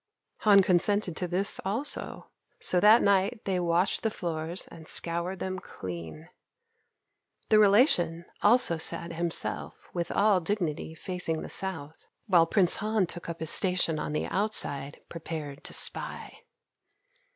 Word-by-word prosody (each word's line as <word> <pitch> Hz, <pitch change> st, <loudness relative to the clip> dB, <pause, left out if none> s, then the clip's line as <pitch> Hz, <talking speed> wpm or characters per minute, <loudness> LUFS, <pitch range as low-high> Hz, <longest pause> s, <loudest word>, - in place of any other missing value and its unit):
Han 200 Hz, -2 st, +5 dB
consented 185 Hz, 0 st, +1 dB
to 180 Hz, -, -2 dB
this 185 Hz, +3 st, 0 dB
also, 225 Hz, +10 st, -4 dB, 0.3 s
so 180 Hz, -, +1 dB
that 215 Hz, +4 st, +6 dB
night 200 Hz, +3 st, +1 dB
they 190 Hz, -2 st, 0 dB
washed 175 Hz, +2 st, +1 dB
the 225 Hz, -, 0 dB
floors 170 Hz, -2 st, -4 dB
and 160 Hz, -1 st, -12 dB
scoured 170 Hz, +3 st, -1 dB
them 185 Hz, 0 st, -4 dB
clean. 85 Hz, -, -8 dB, 1.2 s
The 215 Hz, -, +5 dB
relation 195 Hz, -, +4 dB, 0.2 s
also 205 Hz, -7 st, +4 dB
sat 170 Hz, +1 st, 0 dB
himself 170 Hz, 0 st, -4 dB
with 175 Hz, -1 st, -3 dB
all 205 Hz, -2 st, +3 dB
dignity 165 Hz, -4 st, -3 dB
facing 165 Hz, -2 st, -3 dB
the -, -, -7 dB
south, 160 Hz, -5 st, -5 dB, 0.2 s
while 175 Hz, -6 st, +4 dB
Prince 180 Hz, -1 st, +3 dB
Han 215 Hz, -2 st, 0 dB
took 170 Hz, 0 st, -8 dB
up 165 Hz, -1 st, -6 dB
his 160 Hz, -, -1 dB
station 180 Hz, -4 st, +2 dB
on 150 Hz, -, -4 dB
the 150 Hz, -, -1 dB
outside 145 Hz, -9 st, -1 dB
prepared 155 Hz, -3 st, -7 dB
to -, -, -6 dB
spy. -, -, -1 dB
175 Hz, 140 wpm, -28 LUFS, 165-200 Hz, 1.2 s, that